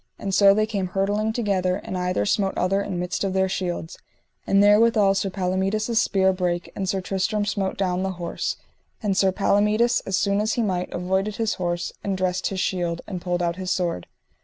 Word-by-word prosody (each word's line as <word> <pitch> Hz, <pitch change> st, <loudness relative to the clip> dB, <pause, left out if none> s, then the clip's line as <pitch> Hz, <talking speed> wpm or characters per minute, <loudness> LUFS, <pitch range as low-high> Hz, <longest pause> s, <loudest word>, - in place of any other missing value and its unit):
And 195 Hz, -1 st, -4 dB
so 200 Hz, 0 st, +6 dB
they 215 Hz, 0 st, +2 dB
came 200 Hz, -4 st, -2 dB
hurtling 205 Hz, +4 st, 0 dB
together, 195 Hz, -5 st, 0 dB
and 190 Hz, -, -6 dB
either 180 Hz, -, 0 dB
smote 195 Hz, -, 0 dB
other 195 Hz, +2 st, +1 dB
in 195 Hz, -3 st, -4 dB
midst 180 Hz, +4 st, -2 dB
of 195 Hz, -1 st, -1 dB
their 190 Hz, 0 st, +2 dB
shields; 180 Hz, -3 st, -4 dB, 0.5 s
and 195 Hz, +1 st, +4 dB
therewithal 210 Hz, -1 st, +5 dB
Sir 195 Hz, 0 st, -1 dB
Palomides' 195 Hz, +4 st, 0 dB
spear 190 Hz, -4 st, +2 dB
brake, 180 Hz, -1 st, -2 dB
and 190 Hz, -2 st, -2 dB
Sir 195 Hz, -1 st, 0 dB
Tristram 195 Hz, +3 st, -1 dB
smote 195 Hz, -1 st, -2 dB
down 185 Hz, -2 st, 0 dB
the 190 Hz, 0 st, -2 dB
horse; 175 Hz, -1 st, -3 dB, 0.5 s
and 200 Hz, -2 st, +1 dB
Sir 190 Hz, 0 st, +3 dB
Palomides, 210 Hz, +4 st, +2 dB
as 190 Hz, -1 st, +1 dB
soon 200 Hz, +1 st, +1 dB
as 215 Hz, +1 st, 0 dB
he 235 Hz, -, 0 dB
might, 180 Hz, -3 st, -2 dB
avoided 190 Hz, +3 st, -1 dB
his 225 Hz, -1 st, 0 dB
horse, 175 Hz, 0 st, -2 dB
and 195 Hz, -1 st, -1 dB
dressed 185 Hz, -1 st, 0 dB
his 195 Hz, -, -3 dB
shield, 175 Hz, -3 st, -1 dB
and 185 Hz, -4 st, -6 dB
pulled 175 Hz, 0 st, -1 dB
out 170 Hz, 0 st, -1 dB
his 185 Hz, -1 st, -4 dB
sword. 170 Hz, -, -1 dB
190 Hz, 200 wpm, -24 LUFS, 180-205 Hz, 0.5 s, so